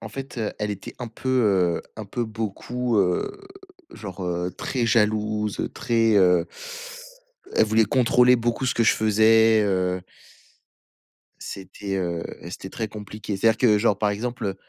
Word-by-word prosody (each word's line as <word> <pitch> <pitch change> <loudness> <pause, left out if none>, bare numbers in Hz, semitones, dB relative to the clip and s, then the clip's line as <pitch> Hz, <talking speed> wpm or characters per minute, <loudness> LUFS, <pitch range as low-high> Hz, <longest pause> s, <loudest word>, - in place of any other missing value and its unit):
En 110 - -7
fait, 135 +2 -7
heu, 110 -2 -2
elle 105 0 -2
était 100 - -7
un 120 - -5
peu, 105 -8 +1
heu, - - -18
un 110 - -6
peu, 120 +4 -3
beaucoup, 115 +2 -3
heu, 90 - 0 0.5
genre, 95 -3 -7
heu, 90 0 -2
très 120 -3 -2
jalouse, 105 -2 +1
très, 115 -4 +2
heu 90 -3 +4 1.1
elle - - +5
voulait 110 +1 +3
contrôler 125 +2 +4
beaucoup 120 +2 -1
ce 125 - +1
que 115 - +2
je - - +5
faisais, 110 +1 +4
heu 90 -2 0 1.4
C'était, 95 +1 -6
heu, 85 -3 -2 0.3
c'était 95 +1 -8
très 110 +3 -4
compliqué. 105 0 -6
C'est-à-dire 110 +3 +3
que 110 -4 +4
genre, 105 -2 +2
par 105 0 +1
exemple, 120 +4 -3
heu, 95 -1 -2
110 Hz, 155 wpm, -24 LUFS, 95-115 Hz, 1.4 s, elle